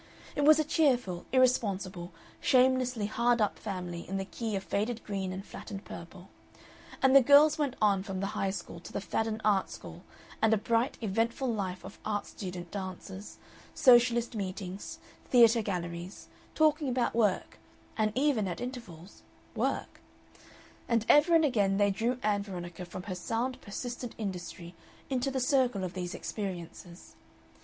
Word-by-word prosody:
It 290 - +1
was 310 0 +8
a 310 - +2
cheerful, 250 - +1
irresponsible, 200 -8 +1 0.3
shamelessly 255 -3 +3
hard 235 +3 +2
up 210 -2 0
family 180 -5 -5
in 195 - -2
the 195 - -3
key 220 +1 -4
of 195 - -3
faded 220 +4 -2
green 195 -2 -3
and 190 +2 -6
flattened 200 -3 -8
purple, 175 +2 -10 0.7
and 265 0 +5
the 275 - +10
girls 290 +4 +6
went 280 -4 0
on 200 -3 +3
from 195 -1 -5
the 195 +2 -3
High 195 - 0
School 185 -3 -6
to - - -11
the - - -2
Fadden 220 +2 -2
Art 200 -3 +3
School - - -10 0.4
and 220 0 +5
a - - 0
bright, 230 +5 0
eventful 230 +4 0
life 185 -4 -3
of 195 - -11
art 205 -1 -2
student 180 -3 -7
dances, 190 0 -7 0.4
Socialist 240 -3 +5
meetings, 190 -1 -5 0.3
theatre 235 -2 +6
galleries, 175 -2 -5 0.3
talking 305 -2 +3
about 250 -1 0
work, 215 -5 0 0.4
and 215 -1 +1
even, 260 -7 +2
at 175 - -4
intervals, 220 -9 -8 0.3
work; - - -2 0.9
and 230 -2 +2
ever 305 +4 +6
and 320 -1 +5
again 205 -8 +2
they 205 0 +3
drew 235 +5 -1
Ann 205 -1 +2
Veronica 180 -3 -7
from 180 +1 -8
her 185 - -5
sound 235 +8 -3
persistent 245 +3 -6
industry 180 -4 -6 0.4
into 260 +1 0
the 265 -1 -2
circle 255 -6 +2
of 185 -1 -4
these 180 -1 -4
experiences. 175 -3 -7
210 Hz, 155 wpm, -30 LUFS, 190-245 Hz, 0.9 s, the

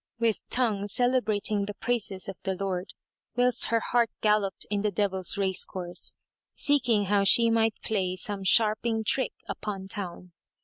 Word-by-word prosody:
with 230 -2 0
tongue 215 -5 +1
celebrating 215 -3 +1
the 205 0 -6
praises 210 -6 -1
of 195 - -5
the 190 -1 -2
Lord, 190 -1 -3 0.5
whilst 245 0 +2
her 230 - +2
heart 235 -1 +3
galloped 210 -2 +1
in 205 -1 0
the 210 - +1
Devil's 190 -2 -1
race 190 -2 +1
course, 175 -2 -6 0.4
seeking 245 -8 +2
how 200 +1 +2
she 230 +4 +5
might 225 -1 +2
play 190 -4 -1
some 195 +1 -1
sharping 220 +3 +3
trick 260 +3 0
upon 195 -3 -5
town. 180 -3 -6
205 Hz, 150 wpm, -27 LUFS, 195-230 Hz, 0.5 s, she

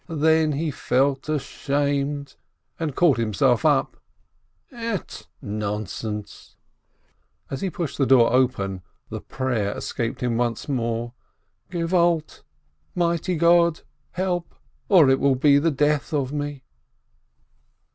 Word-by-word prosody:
Then 160 -1 +2
he 155 +2 -1
felt 135 +1 0
ashamed, 140 -1 -2 0.4
and 155 -5 -3
caught 170 -6 +4
himself 115 +2 +2
up, 145 -4 +2 0.7
"Ett, 230 -6 -5 0.2
nonsense!" 105 0 -5 1.0
As 135 - -4
he 195 - -1
pushed 165 -5 -5
the 135 - +3
door 125 -3 +5
open, 100 -8 +1 0.3
the - - -6
"prayer" 120 -6 -2
escaped 115 -1 -4
him 120 -2 0
once 120 -2 -1
more, 120 -3 -2 0.6
"Help, 170 -2 +1 0.6
mighty 170 0 0
God! 170 0 +4 0.4
or 180 -2 +1
it 135 0 +4
will 140 -1 +3
be 140 +2 +4
the 165 +3 +2
death 150 +2 0
of 140 -2 -1
me 145 -2 -4
140 Hz, 110 wpm, -23 LUFS, 125-165 Hz, 1.0 s, door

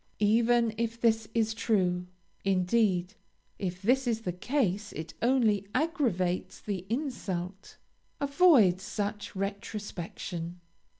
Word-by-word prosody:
Even 230 +1 +3
if 230 0 -1
this 225 -2 +2
is 220 -1 +2
true, 185 -5 +1 0.4
(indeed, 190 0 +2 0.5
if 180 -1 -4
this 255 +4 +3
is 225 -2 0
the 180 - -2
case, 215 -1 -1
it 160 +2 -6
only 225 -5 +3
aggravates 245 - 0
the 190 -3 -4
insult); 200 - -4 0.4
avoid 280 - +5
such 205 0 -4
retrospection. 190 -3 -5
210 Hz, 105 wpm, -29 LUFS, 185-235 Hz, 0.5 s, avoid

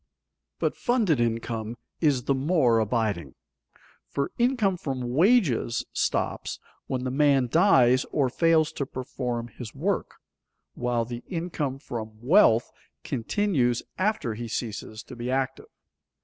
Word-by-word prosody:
But - - 0
funded 225 - +1
income 115 -1 -2 0.2
is 140 -6 +2
the 140 - +1
more 135 -4 +3
abiding, 105 - -1 0.7
for 140 0 -2
income 235 -6 +2
from 130 -7 -4
wages 160 - +3
stops - - -1 0.3
when 130 -1 -2
the 130 - -2
man 140 -1 +3
dies 130 - +5
or 140 -3 +1
fails 160 +3 +3
to 140 -4 -4
perform 125 -3 -4
his 120 +2 -9
work, 180 +7 -1 0.6
while 120 -1 -1
the 120 +1 -7
income 165 -6 -3
from 110 -5 -7
wealth 125 - +4 0.3
continues 125 - 0 0.2
after 190 - 0
he 120 +2 -6
ceases 110 -1 -5
to - - -11
be 120 +1 -4
active. 130 0 -2
130 Hz, 125 wpm, -26 LUFS, 120-160 Hz, 0.7 s, dies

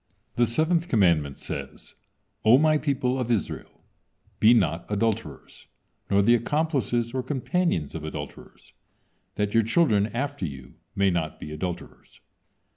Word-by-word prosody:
The 120 0 +3
seventh 160 +7 +1
commandment 85 - +2
says: - - -7 0.5
"O 110 +4 +7
My 155 +1 +3
people 135 -3 0
of 125 -2 -2
Israel, 115 -5 -3 0.6
be 110 - +6
not 85 -8 +2
adulterers, 105 - -3 0.4
nor 100 0 +3
the 120 - +5
accomplices 120 - 0
or 130 - -1
companions 135 - -1
of 80 - -6
adulterers, 80 - -9 0.6
that 105 -1 -1
your 115 - +5
children 110 -3 +2
after 135 +3 -4
you 65 -2 -10 0.2
may 100 -1 +3
not 80 -3 -2
be 75 - -8
adulterers. 85 +3 -7
115 Hz, 130 wpm, -25 LUFS, 90-135 Hz, 0.6 s, O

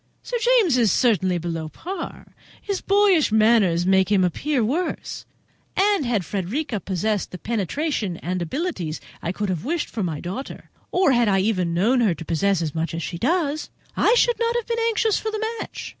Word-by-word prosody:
Sir - - -2
James 455 - +4
is 225 -5 +4
certainly 190 -7 +2
below 165 -2 -4
par 355 - -7 0.3
(his 400 -2 -3
boyish 395 - +3
manners 215 -6 +4
make 190 +1 +3
him 195 -3 +4
appear 245 - 0
worse); 325 +10 -3 0.5
and 390 -7 +3
had 215 -7 0
Frederica 210 - -2
possessed 195 +3 -1
the 180 - -7
penetration 220 - -2
and 180 +2 -3
the - - -1
abilities 185 - -3
which - - -20
I 170 - -2
could 205 +2 -3
have 180 -4 -2
wished 310 +2 -2
in 215 - -1
my 155 -3 -4
daughter, 195 +10 -7 0.2
or 365 -5 +3
had 240 -2 +3
I 195 -1 +3
even 185 -5 0
known 235 +8 +3
her 200 -7 +2
to 165 - -9
possess 180 +2 +1
as 155 -3 -3
much 165 +1 -2
as 165 - -3
she 170 - -5
does, 310 - 0 0.3
I 475 - +4
should 480 -1 +3
not 465 0 +1
have 475 -2 -1
been 465 0 -2
anxious 440 -1 +1
for 440 - -3
the 435 0 -2
match." - - -6
220 Hz, 195 wpm, -23 LUFS, -, 0.5 s, James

